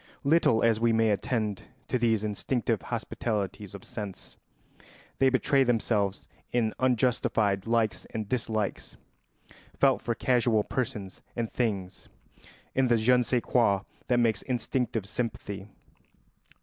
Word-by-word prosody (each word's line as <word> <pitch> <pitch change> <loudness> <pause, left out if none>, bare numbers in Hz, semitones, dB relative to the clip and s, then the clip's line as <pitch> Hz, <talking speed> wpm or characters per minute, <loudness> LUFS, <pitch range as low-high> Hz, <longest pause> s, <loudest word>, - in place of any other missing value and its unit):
Little 140 -6 +4
as 115 -2 +3
we 115 0 +3
may 110 -1 +3
attend 105 -1 -1 0.2
to 125 - 0
these 115 -3 +2
instinctive 105 +3 -1
hospitalities 105 -3 -3
of 100 - -10
sense, 100 -3 -7 0.8
they 135 - +5
betray 135 +1 +3
themselves 110 -5 0 0.2
in 115 -3 +1
unjustified 115 -5 +1
likes 115 -1 +1
and 110 -2 -5
dislikes 110 -3 -2 0.8
felt 135 -2 +3
for 115 - -2
casual 120 -4 +2
persons 110 -8 -4
and 115 -2 -2
things, 100 -7 -2 0.6
in 135 -1 +2
the 120 -1 +4
je 120 +3 +4
ne 125 - +3
sais 120 0 0
quoi 100 -6 +3 0.3
that 125 - +2
makes 115 -4 +2
instinctive 125 -3 -1
sympathy. 100 -3 -4
115 Hz, 125 wpm, -28 LUFS, 105-125 Hz, 0.8 s, they